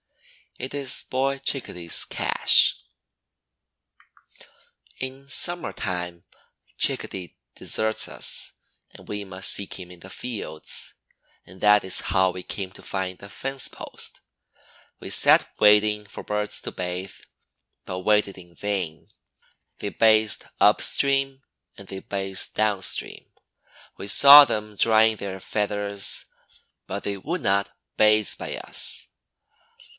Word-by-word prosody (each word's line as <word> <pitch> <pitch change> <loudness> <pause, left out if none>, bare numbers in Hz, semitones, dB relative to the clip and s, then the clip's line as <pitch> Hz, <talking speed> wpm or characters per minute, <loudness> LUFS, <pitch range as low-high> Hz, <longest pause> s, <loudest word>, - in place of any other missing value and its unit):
It 130 - -6
is 140 -2 0
Boy 135 +1 -1
Chickadee's 90 - 0
cache. - - +4 2.2
In 130 +1 -6
summer 175 +5 0
time 90 -2 -4 0.5
Chickadee 90 -4 0 0.2
deserts 110 0 -1
us - - -1 0.4
and - - -16
we 105 0 -4
must 95 0 0
seek 100 - -3
him 90 -1 -9
in 90 - -13
the 95 - -11
fields, 95 -10 -4 0.5
and 90 +1 -15
that 105 0 +5
is 95 - +2
how 95 0 +1
we 90 - -7
came 95 0 -4
to - - -14
find 95 -1 -4
the 100 - -11
fence 135 +6 -3
post. - - -5 0.8
We - - -8
sat - - +4
waiting 105 0 +4
for 100 - -9
birds 105 0 -3
to - - -6
bathe, 90 +1 -5 0.7
but 90 - -5
waited 105 0 +1
in 85 -2 -15
vain. 95 -6 -4 0.7
They 100 - -4
bathed 110 0 +2
up - - +4
stream 135 -1 +1 0.3
and 100 - -11
they 95 - -7
bathed 95 -1 -2
down 105 -3 0
stream. 90 - -2 0.7
We 100 - -7
saw 140 +7 +10
them 105 -4 -4
drying 110 +1 +4
their 95 -2 -6
feathers, 100 0 -1 0.6
but 100 +2 -5
they 100 -1 -2
would 165 - -3
not 100 0 0 0.3
bathe 105 -1 +4
by - - -5
us. - - -1
105 Hz, 125 wpm, -24 LUFS, 95-110 Hz, 2.2 s, saw